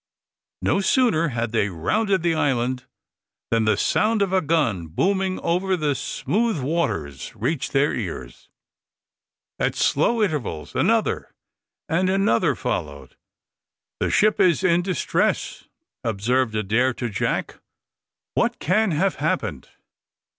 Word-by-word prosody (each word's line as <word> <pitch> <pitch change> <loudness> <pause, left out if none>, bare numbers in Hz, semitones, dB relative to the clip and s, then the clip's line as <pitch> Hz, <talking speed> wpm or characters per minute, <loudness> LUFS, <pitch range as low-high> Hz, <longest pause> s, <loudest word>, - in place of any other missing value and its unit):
No - - +2
sooner 205 - +3
had 120 -4 -2
they 110 -3 +1
rounded 190 - 0
the 170 -1 +2
island 130 -4 0 0.6
than 115 -1 +2
the 110 -2 +2
sound 215 - +2
of 190 -1 -2
a 190 - +3
gun, 135 - 0
booming 190 - 0
over 185 +2 0
the 150 -3 0
smooth 220 - -1
waters, 125 - -2
reached 135 +6 -2
their 140 +2 +2
ears. - - -6 1.1
At - - 0
slow 235 -2 +2
intervals 130 - -3
another - - 0 0.5
and 180 +4 +1
another 190 -11 +2
followed. 70 -2 -4 0.8
"The - - 0
ship 215 +1 +3
is 175 -5 +3
in 175 -1 +3
distress," 180 -3 -1 0.4
observed 115 +2 0
Adair 115 +5 +1
to 120 - -3
Jack. 100 -5 -2 0.7
"What - - +1
can 210 +5 +2
have 185 +4 0
happened?" 145 - -2
150 Hz, 120 wpm, -23 LUFS, 115-185 Hz, 1.1 s, sooner